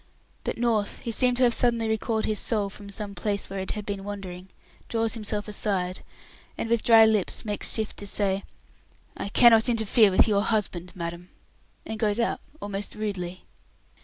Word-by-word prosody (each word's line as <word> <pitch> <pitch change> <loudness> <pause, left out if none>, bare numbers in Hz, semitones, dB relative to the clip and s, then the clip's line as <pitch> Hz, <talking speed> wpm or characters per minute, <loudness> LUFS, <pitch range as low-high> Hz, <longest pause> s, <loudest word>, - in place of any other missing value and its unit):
But - - -3
North, 230 -3 0
who 235 - -3
seemed 250 +2 +3
to 255 - +4
have 240 -1 +5
suddenly 235 -1 +2
recalled 220 0 -1
his 215 -1 +1
soul 205 -4 0
from 205 0 -11
some 200 0 -5
place 200 -1 -2
where 195 - -4
it 190 - -3
had 210 -1 -6
been 200 -1 -4
wandering, 190 -2 -7 0.4
draws 225 -1 0
himself 210 -2 -3
aside, 195 -3 -2 0.6
and - - -3
with 235 -2 +3
dry 225 -1 +7
lips 215 -2 +1
makes 205 -1 -1
shift 220 -1 -1
to 205 - -6
say, 195 -1 0 0.7
"I - - -5
cannot 230 +1 +6
interfere 220 -1 +4
with 185 - +4
your 205 -2 +2
husband, 205 -5 -1
madam," 170 0 -6 0.6
and 220 - -5
goes 215 0 +1
out 230 - 0 0.2
almost 205 0 -4
rudely. 185 -4 -4
210 Hz, 175 wpm, -26 LUFS, 195-225 Hz, 0.7 s, dry